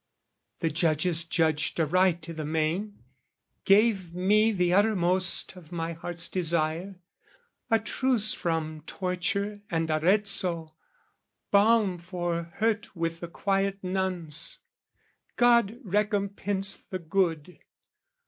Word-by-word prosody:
The 165 Hz, -2 st, 0 dB
judges 165 Hz, +1 st, +1 dB
judged 160 Hz, -1 st, 0 dB
aright 175 Hz, +1 st, +2 dB
i' -, -, -6 dB
the 155 Hz, -1 st, -5 dB
main, 160 Hz, +7 st, -2 dB, 0.6 s
gave 195 Hz, -4 st, +3 dB
me 210 Hz, +5 st, +3 dB
The 180 Hz, -3 st, +1 dB
uttermost 185 Hz, -3 st, +2 dB
of 175 Hz, -3 st, -15 dB
my 170 Hz, -1 st, -3 dB
heart's 170 Hz, +1 st, -5 dB
desire, 170 Hz, +1 st, -1 dB, 0.7 s
a 225 Hz, -, +4 dB
truce 220 Hz, 0 st, +2 dB
From 160 Hz, -2 st, -3 dB
torture 200 Hz, +2 st, -2 dB
and 165 Hz, -1 st, -1 dB
Arezzo, 170 Hz, -1 st, +2 dB, 0.8 s
balm 205 Hz, -3 st, +3 dB
for 175 Hz, -1 st, -3 dB
hurt 215 Hz, -2 st, -1 dB
With 165 Hz, -1 st, -3 dB
the 170 Hz, -, -6 dB
quiet 195 Hz, +2 st, -1 dB
nuns, 180 Hz, -5 st, -2 dB, 0.8 s
God 235 Hz, -2 st, +3 dB
recompense 200 Hz, -1 st, -1 dB
the 185 Hz, -, -7 dB
good! 170 Hz, -1 st, -2 dB
180 Hz, 105 wpm, -27 LUFS, 165-200 Hz, 0.8 s, a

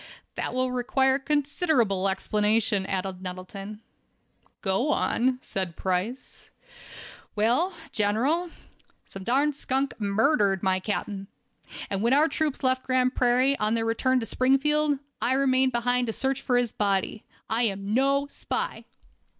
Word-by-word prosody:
"That -, -, -4 dB
will 255 Hz, 0 st, 0 dB
require 265 Hz, +2 st, +1 dB
considerable 275 Hz, -, +1 dB
explanation," 210 Hz, +1 st, +1 dB
added 190 Hz, -1 st, -3 dB
Nettleton. 195 Hz, +3 st, -7 dB, 0.8 s
"Go 195 Hz, +9 st, 0 dB
on," 255 Hz, -3 st, +1 dB
said 185 Hz, -4 st, -3 dB
Price. 190 Hz, +8 st, -3 dB, 0.9 s
"Well, 240 Hz, -, +2 dB, 0.2 s
General, 250 Hz, +12 st, +1 dB, 0.6 s
some 195 Hz, -, -7 dB
darn 275 Hz, +7 st, +2 dB
skunk 270 Hz, -1 st, -1 dB
murdered 200 Hz, -, +2 dB
my 190 Hz, -1 st, +2 dB
captain, 200 Hz, 0 st, -4 dB, 0.6 s
and 195 Hz, -1 st, -2 dB
when 235 Hz, +3 st, +3 dB
our 300 Hz, +3 st, +5 dB
troops 310 Hz, -3 st, -2 dB
left 260 Hz, 0 st, +2 dB
Grand 255 Hz, 0 st, +1 dB
Prairie, 255 Hz, +3 st, +3 dB
on 215 Hz, +2 st, +1 dB
their 225 Hz, 0 st, 0 dB
return 255 Hz, +3 st, +2 dB
to -, -, -3 dB
Springfield, 285 Hz, +5 st, +2 dB, 0.2 s
I 255 Hz, -, +2 dB
remained 265 Hz, -1 st, +3 dB
behind 245 Hz, +1 st, +1 dB
to 225 Hz, -, -2 dB
search 270 Hz, +2 st, -1 dB
for 250 Hz, -2 st, +1 dB
his 245 Hz, -2 st, +1 dB
body. 200 Hz, +1 st, -1 dB, 0.2 s
I 230 Hz, +2 st, +2 dB
am 200 Hz, -1 st, -2 dB
no 275 Hz, +3 st, +2 dB
spy." 285 Hz, -, -4 dB
245 Hz, 135 wpm, -26 LUFS, 200-270 Hz, 0.9 s, our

